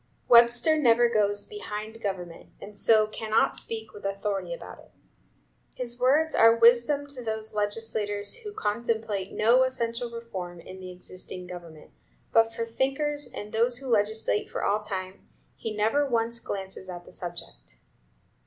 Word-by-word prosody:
Webster 240 +6 +6
never 240 -3 +5
goes 205 -2 +1
behind 220 - -7
government, 180 -5 -5
and 210 +1 -10
so 215 0 +5
cannot 215 +1 +1
speak 225 -1 -5
with 205 - -11
authority 195 - -2
about - - -8
it. - - -17 0.9
His 245 -1 -5
words 295 +6 +3
are 230 0 +7
wisdom 240 +5 +5
to 280 -3 -7
those 220 -1 -4
legislators 205 - -1
who 440 -3 -7
contemplate 220 - -2
no 235 +4 +4
essential 240 -2 -1
reform 190 -7 -7
in 185 +3 -10
the 185 -1 -8
existing 180 0 -8
government; 170 -3 -10 0.4
but 225 0 +4
for 230 0 -3
thinkers, 275 +5 -1
and 210 +1 -7
those 235 +2 +3
who 270 - -9
legislate 220 -2 +1
for - - -4
all 205 +1 +2
time, 190 -3 -6 0.3
he 225 - -5
never 220 +8 +2
once 230 -1 0
glances 190 -2 -6
at 175 -1 -7
the - - -14
subject. 170 - -9
220 Hz, 150 wpm, -27 LUFS, 200-240 Hz, 0.9 s, are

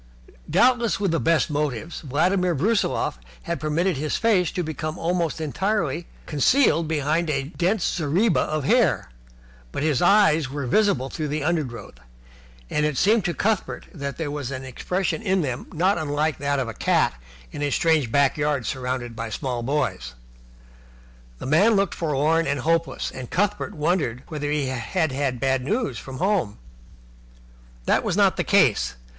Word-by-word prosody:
Doubtless 240 -4 +3
with 200 -4 0
the 165 - +1
best 165 -1 +2
motives, 150 +1 -2
Vladimir 175 +5 +1
Brusiloff 195 - 0 0.2
had 170 0 -3
permitted 160 +2 0
his 150 +2 -1
face 200 -7 +2
to 180 - -1
become 155 +1 -4
almost 170 -1 -1
entirely 170 0 -1 0.2
concealed 165 - +3
behind 155 +2 0
a 140 -2 0
dense 180 +6 -1
zareba 175 +6 +1
of 155 -1 -1
hair, - - +2 0.6
but - - -3
his 150 -4 +1
eyes 175 -7 +4
were 140 0 -4
visible 135 - +2
through 155 -3 -3
the 150 0 -2
undergrowth, 130 - -3 0.7
and 150 - 0
it 150 -3 0
seemed 215 +1 +3
to 175 - -1
Cuthbert 215 -1 -1
that 140 -4 -5
there 155 -3 -3
was 145 -3 -4
an 130 -1 -5
expression 165 +6 -2
in 190 -3 +1
them 125 -4 -4
not 180 +3 +1
unlike 150 0 -1
that 140 0 0
of 130 -3 -1
a 115 - -5
cat - - +2 0.4
in - - -6
a 145 - +1
strange 155 -5 +2
backyard 140 -1 +1
surrounded 125 -2 -3
by 115 0 -4
small 125 +2 -3
boys. 120 - -2 1.2
The - - -8
man 195 - +4
looked 195 0 +1
forlorn 160 +1 +1
and 140 -2 -1
hopeless, 165 +3 0
and 130 -2 -8
Cuthbert 205 +1 -1
wondered 150 -6 0
whether 150 -3 -3
he 150 -1 0
had 130 +6 -1
had 130 -2 -1
bad 130 0 +1
news 215 - -1
from 135 -1 -8
home. 180 - 0 1.3
This - - +3
was - - -2
not - - +4
the - - +1
case. - - +3
155 Hz, 160 wpm, -24 LUFS, 135-175 Hz, 1.3 s, eyes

